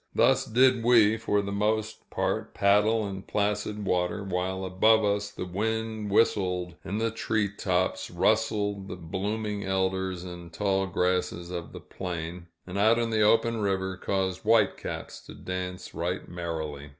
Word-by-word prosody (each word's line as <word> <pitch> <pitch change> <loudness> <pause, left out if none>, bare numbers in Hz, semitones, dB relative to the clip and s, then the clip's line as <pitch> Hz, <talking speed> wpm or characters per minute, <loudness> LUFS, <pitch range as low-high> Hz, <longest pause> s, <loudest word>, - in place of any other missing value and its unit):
Thus - - +4
did 125 +1 +4
we 115 -2 +5
for 105 -2 0
the 100 - -4
most 110 +2 -1
part - - -2
paddle 105 +2 +3
in 95 -1 -5
placid 105 +1 -1
water, 90 +2 0
while 95 0 -2
above 110 +4 +4
us 100 0 0
the 90 - -6
wind 110 +3 -2
whistled 90 -4 +2
in 95 +2 -3
the 115 0 0
tree 110 -2 0
tops, 90 -1 0
rustled 105 +1 +1
the 90 - -5
blooming 100 +4 -3
elders 95 -1 -1
and 90 -1 -8
the - - -13
tall 95 -1 +1
grasses 90 -1 -1
of 85 -2 -5
the - - -8
plain, 85 -1 -6 0.2
and, 95 +2 -4
out 110 +3 +5
in 115 -1 0
the 110 -1 +2
open 115 +2 +4
river, 95 -2 -1
caused 95 -1 -2
white 110 -2 +4
caps - - -6
to - - -10
dance 90 0 -5
right 90 +2 -3
merrily. 80 -5 -5
100 Hz, 160 wpm, -28 LUFS, 90-110 Hz, 0.2 s, we